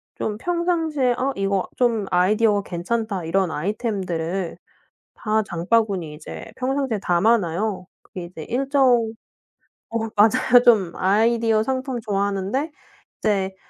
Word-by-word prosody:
좀 210 -1 -3
평상시에 325 -5 0
'아 270 +1 0
이거 195 -1 0
좀 230 -4 +1
아이디어가 205 +3 +3
괜찮다.' 195 +1 -2
이런 185 +2 +1
아이템들을 185 -2 -3 0.6
다 215 0 0
장바구니에 185 -2 0
이제 150 +1 -9
평상시에 265 -3 -1
담아 200 +7 +3
놔요. 185 +1 -3 0.2
그게 180 - -8
이제 165 -3 -9
일정 255 -3 +2 0.8
어 230 - -2 0.2
맞아요. 220 +3 +5
좀 210 -8 +5
아이디어 225 +2 +2
상품 260 0 -2
좋아하는데 200 +7 -1 0.5
이제 195 -3 0
215 Hz, 280 characters per minute, -22 LUFS, 190-240 Hz, 0.8 s, 맞아요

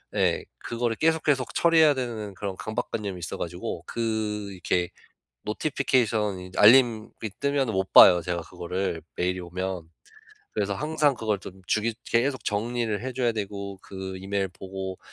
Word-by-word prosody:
예. - - +2 0.2
그거를 120 -1 -2
계속 160 0 +2
계속 135 -4 +1
처리해야 160 -3 +5
되는 115 -6 -4
그런 100 -1 -4
강박 110 +3 -3
관념이 100 -4 -3
있어 85 - -5
가지고 85 0 -5
그 110 -3 -2
이렇게 90 -1 0 0.6
노티피케이션 110 -5 0
이제 90 0 -8
알림이 115 -1 +6 0.3
뜨면은 140 -4 +1
못 95 0 -1
봐요 90 -2 +9
제가 85 +1 -2
그거를 85 +1 -3
메일이 90 +1 0
오면. 90 -1 -4 0.6
그래서 100 -1 -1
항상 150 +2 +1
그걸 110 -2 -1
좀 95 0 -10
주기 110 +1 +1
계속 130 +3 0
정리를 110 0 -1
해 130 0 -3
줘야 120 -2 +1
되고 100 -2 -5
그 95 -1 -7
이메일 95 +1 -1
보고 95 0 -7
105 Hz, 330 characters per minute, -26 LUFS, 95-120 Hz, 0.6 s, 봐요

